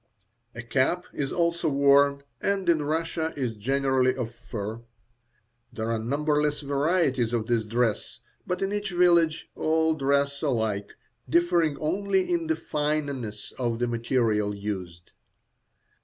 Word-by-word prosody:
A 120 - -6
cap 135 +8 +1
is 140 -2 -2
also 170 -1 +1
worn, 140 0 +4 0.2
and 200 -1 0
in 165 -3 +4
Russia 160 +2 -1
is 130 -4 -1
generally 130 +3 +1
of 120 -3 -4
fur. 110 -1 -6 0.9
There 110 +1 -3
are 115 - 0
numberless 150 +5 0
varieties 140 -4 +1
of 115 -2 0
this 115 -1 0
dress, 115 0 -1 0.3
but 180 +2 -1
in 195 +1 -1
each 205 -1 -2
village 170 -3 +3
all 160 0 +1
dress 140 -1 0
alike, 110 -8 -1 0.4
differing 170 -2 +2
only 190 +3 0
in 165 -2 0
the 160 - +1
fineness 145 -9 -3
of 120 -2 0
the 120 - 0
material 115 -3 0
used. 95 -4 -6
140 Hz, 130 wpm, -26 LUFS, 115-160 Hz, 0.9 s, worn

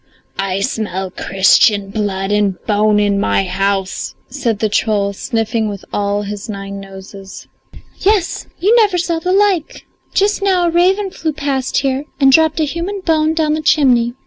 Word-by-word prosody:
I 195 0 -1
smell 190 -5 -3
Christian 195 +2 +2
blood 195 -2 -2
and 205 -3 +1
bone 210 0 +2
in 205 -1 +1
my 195 - +1
house," 195 +1 -2 0.2
said 245 -5 -1
the 215 - 0
troll, 205 -1 0
sniffing 225 0 -2
with 200 -2 -8
all 205 0 -1
his 205 +2 -6
nine 200 -1 -6
noses. 195 0 -11 0.5
"Yes, 395 -3 0
you 415 +6 +3
never 415 -5 +3
saw 340 -1 -1
the 360 +3 -2
like! 390 -4 +1 0.3
Just 405 +1 +1
now 375 -3 +2
a 340 - +1
raven 380 +3 +2
flew 320 -3 -3
past 280 -3 -2
here 270 +1 0
and 270 -1 +5
dropped 320 +2 +3
a - - +2
human 340 +7 -3
bone 320 -2 +1
down 310 -2 +1
the 310 - -1
chimney. 250 -6 +3
230 Hz, 165 wpm, -16 LUFS, 200-325 Hz, 0.5 s, and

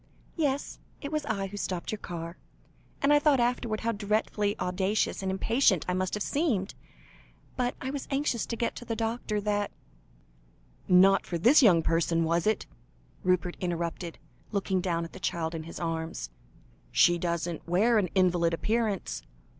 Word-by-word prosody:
"Yes, 285 -4 -1 0.2
it 285 - -6
was 305 -2 -2
I 200 -3 -1
who 200 +1 -7
stopped 185 -3 -3
your 215 - -4
car, 170 -2 -6 0.7
and 285 +1 +5
I 295 - +6
thought 290 -3 +4
afterwards 235 -2 0
how 230 - +1
dreadfully 210 -1 0
audacious 190 +4 0
and 190 - -2
impatient 195 - +2
I 180 - 0
must 185 +1 -1
have 210 - -2
seemed. 245 - 0 0.8
But 250 0 -1
I 260 - -3
was 280 -1 -5
anxious 275 -4 0
to 230 - -3
get 235 0 0
quickly - - -9
to 240 - -11
the 225 - -2
doctor, 225 -2 -2
that 205 0 0 0.7
" - - -33 0.2
"Not 195 0 +3
for 175 - -2
this 245 - +6
young 180 -9 +6
person, 165 0 +2
was 165 +3 +1
it?" 215 - +1 0.6
Rupert 180 -1 +1
interrupted, 170 -1 -3 0.3
looking 195 -3 0
down 170 -2 -1
at 165 - -11
the - - -9
child 170 -2 -2
in 160 -1 -5
his 170 - -8
arms 160 - -3 0.6
"she 175 0 +5
doesn't 170 -1 -2
wear 215 +6 +4
an 195 - +1
invalid 175 -3 +3
appearance." 215 - -1
195 Hz, 170 wpm, -29 LUFS, 170-230 Hz, 0.8 s, I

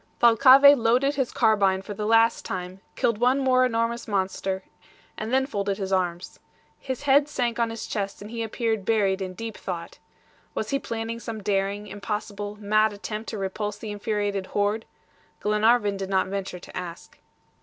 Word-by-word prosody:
Thalcave 270 +4 +8
loaded 245 +5 +3
his 265 -4 -1
carbine 200 -4 +2
for 205 - -6
the 210 +1 -3
last 225 +1 +4
time, 185 0 -5
killed 230 -2 +1
one 250 +3 +3
more 260 -2 +3
enormous 235 -1 0
monster, 190 -1 -2 0.5
and 220 +2 -5
then 265 +1 +3
folded 200 -6 -2
his 195 -1 -3
arms. 180 -1 -2 0.4
His 260 0 -5
head 285 +1 +4
sank 240 -4 -1
on 230 -1 +2
his 225 0 -6
chest, 200 -1 -3
and 210 +2 -9
he 230 -1 -4
appeared 225 -1 -1
buried 200 -2 +1
in 185 -1 -5
deep 225 0 -6
thought. 175 -3 -6 0.6
Was - - -3
he 275 - +1
planning 230 -1 -4
some 225 -3 -6
daring, 200 0 -1
impossible, 205 0 -5
mad 215 +1 +2
attempt 215 +2 -6
to 220 - -5
repulse 205 +2 -3
the 215 0 -6
infuriated 205 -2 -2
horde? 205 +2 0 0.5
Glenarvan 210 0 +2
did 195 -1 -5
not 190 -1 +2
venture 195 -1 -4
to 180 - -13
ask. 170 -2 -8
210 Hz, 170 wpm, -25 LUFS, 195-230 Hz, 0.6 s, Thalcave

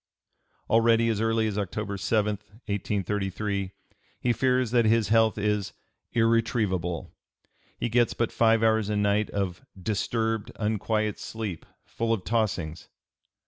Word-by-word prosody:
Already 115 0 +4
as 110 -2 0
early 115 0 +2
as 105 -1 -1
October 100 +1 -3
7, 105 0 0 0.3
1833, 100 -1 -2 0.5
he 120 - +1
fears 125 -1 +1
that 120 -2 +4
his 110 0 +3
health 110 -1 +4
is 105 -1 -1 0.4
"irretrievable;" 110 -7 +1 0.7
he - - -1
gets 120 0 +2
but 115 - 0
five 115 -1 +3
hours 110 -2 +3
a 105 - 0
night 105 +1 +2
of 95 -3 -3 0.2
"disturbed 110 +2 -1
unquiet 110 0 -1
sleep 105 -7 -5 0.2
full 115 0 -1
of 105 -5 -2
tossings." 95 -9 -1
110 Hz, 125 wpm, -27 LUFS, 100-115 Hz, 0.7 s, Already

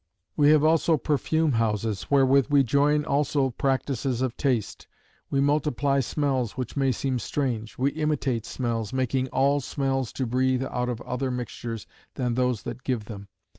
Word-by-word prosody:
"We 145 -1 +4
have 150 -1 +5
also 160 0 +3
perfume 155 +3 +1
houses; 110 -3 -1
wherewith 135 -1 +4
we 145 -1 +5
join 145 +4 +2
also 140 -1 +1
practices 130 -1 -1
of 130 -2 -2
taste. 125 -7 -1 0.4
We 140 - 0
multiply 140 -1 +1
smells, 135 -3 -1
which 130 -3 -4
may 135 -2 +2
seem 130 0 -1
strange. 120 -5 -3
We 135 +3 +1
imitate 145 -7 -1
smells, 115 -4 -2
making 130 0 0
all 140 +2 +2
smells 135 -2 -2
to 130 - -2
breathe 130 +2 +1
outs 125 -1 -2
of 120 -1 -4
other 130 +1 -3
mixtures 120 -2 -5 0.3
than 125 -3 -1
those 125 -3 0
that 120 +2 -7
give 120 -5 -2
them. 100 -2 -9
130 Hz, 160 wpm, -26 LUFS, 120-140 Hz, 0.4 s, have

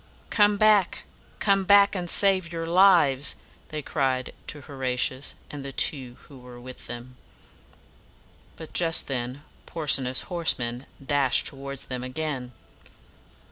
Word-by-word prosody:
"Come 205 -1 +3
back! 210 -3 +3 0.3
come 195 -2 +2
back, 200 +1 +5
and 180 -3 -3
save 190 -3 +3
your 165 -1 -4
lives!" 165 -7 +4 0.3
they 155 -1 -5
cried 130 -4 -1
to 150 - -7
Ho 140 - -13
ra 130 -2 -2
ti 130 - +1
us 135 +3 -4 0.2
and 145 -2 -7
the 140 - -6
two 130 -3 -1
who 135 -3 -15
were 125 -1 -13
with 130 +1 -10
him. 120 +1 -9 1.4
But 160 0 -11
just 165 -2 +3
then 130 +1 -4 0.2
Porsena's 135 -5 +1
horsemen 130 -8 -1 0.2
dashed 140 -2 +2
toward 140 0 -4
them 125 -2 -6
again. 130 -1 -5
140 Hz, 140 wpm, -25 LUFS, 130-170 Hz, 1.4 s, back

